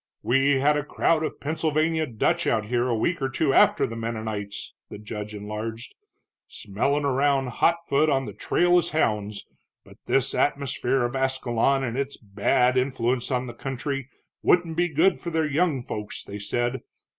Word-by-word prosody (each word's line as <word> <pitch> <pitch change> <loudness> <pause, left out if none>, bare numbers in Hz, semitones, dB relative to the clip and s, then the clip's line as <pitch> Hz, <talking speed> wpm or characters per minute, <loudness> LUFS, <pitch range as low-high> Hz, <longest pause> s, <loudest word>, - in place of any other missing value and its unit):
"We 135 +3 +3
had 145 +2 +3
a 150 - -1
crowd 155 +2 +1
of 155 - -4
Pennsylvania 160 +1 0
Dutch 115 -4 0
out 110 -2 +1
here 120 +2 0
a 120 - +1
week 170 +8 0
or 135 - 0
two 135 +1 +1
after - - +5
the 115 - -6
Mennonites," 110 -3 -4 0.2
the - - -8
judge 105 0 -7
enlarged, 105 +3 -6 0.5
"smellin' 140 +8 -1
around 135 -1 +2
hot 165 +7 +2
foot 150 +3 +3
on 135 -2 +1
the 105 - -7
trail 175 - +3
as - - -1
hounds, 105 -6 0 0.4
but - - -16
this 135 0 +2
atmosphere 135 -2 0
of 120 +2 -2
Ascalon 130 0 +1
and 120 0 -2
its 140 0 -3
bad 125 +4 +1
influence 125 -1 -1
on 125 -1 0
the 120 - -7
country 135 +2 -4 0.3
wouldn't 175 -2 +2
be 175 +1 +1
good 165 +5 +3
for 170 - -4
their 160 -1 0
young 150 -3 +1
folks, 105 -3 -6
they 100 +1 -8
said. 120 +5 -1
130 Hz, 170 wpm, -25 LUFS, 115-145 Hz, 0.5 s, after